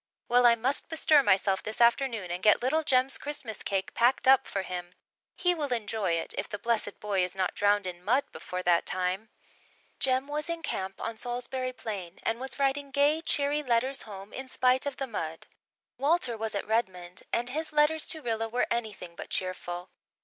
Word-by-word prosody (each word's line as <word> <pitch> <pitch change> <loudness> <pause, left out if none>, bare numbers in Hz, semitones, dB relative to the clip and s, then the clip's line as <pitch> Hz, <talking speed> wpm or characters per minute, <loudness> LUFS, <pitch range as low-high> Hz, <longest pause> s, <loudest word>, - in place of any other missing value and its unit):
Well, 245 0 +6
I 235 - +6
must 255 +5 -1
bestir 315 -2 +5
myself 195 -3 +2
this 215 - -4
afternoon 235 -5 +3
and 175 +1 -3
get 210 +3 +5
little 300 +5 +2
Jem's 260 -1 +3
Christmas 265 -7 -5
cake 195 -1 -2
packed 245 +3 +3
up 265 0 +6
for 195 - -2
him. 180 -1 -6 0.4
He 360 -1 +2
will 295 -5 -3
enjoy 215 -5 0
it, 165 - -2
if - - -4
the 205 - -4
blessed 230 +1 -1
boy 200 -3 +1
is 180 +1 -3
not 185 -1 0
drowned 205 -1 +2
in 180 -1 -6
mud 250 +8 +3
before 180 0 -5
that 175 -1 +3
time." 185 +4 -1 0.7
Jem 260 +1 +1
was 300 +2 -3
in 335 -1 -3
camp 190 -8 -3
on 225 -1 -4
Salisbury 250 +2 -3
Plain 195 -8 -6
and 225 +1 0
was 265 +1 -5
writing 280 0 0
gay, 285 +3 +3
cheery 290 -2 +1
letters 260 0 +1
home 200 -1 -10
in 265 0 -6
spite 255 +1 +2
of 280 - -4
the 270 - -2
mud. 165 -9 -5 0.5
Walter 280 -4 +2
was 220 -1 -3
at 200 - -2
Redmond 185 -6 -1
and 240 +1 0
his 315 +5 -2
letters 305 +1 +3
to 315 -3 -4
Rilla 225 -1 -1
were 245 +2 +1
anything 215 -7 -3
but - - -8
cheerful. 180 -1 -4
235 Hz, 195 wpm, -29 LUFS, 195-270 Hz, 0.7 s, Well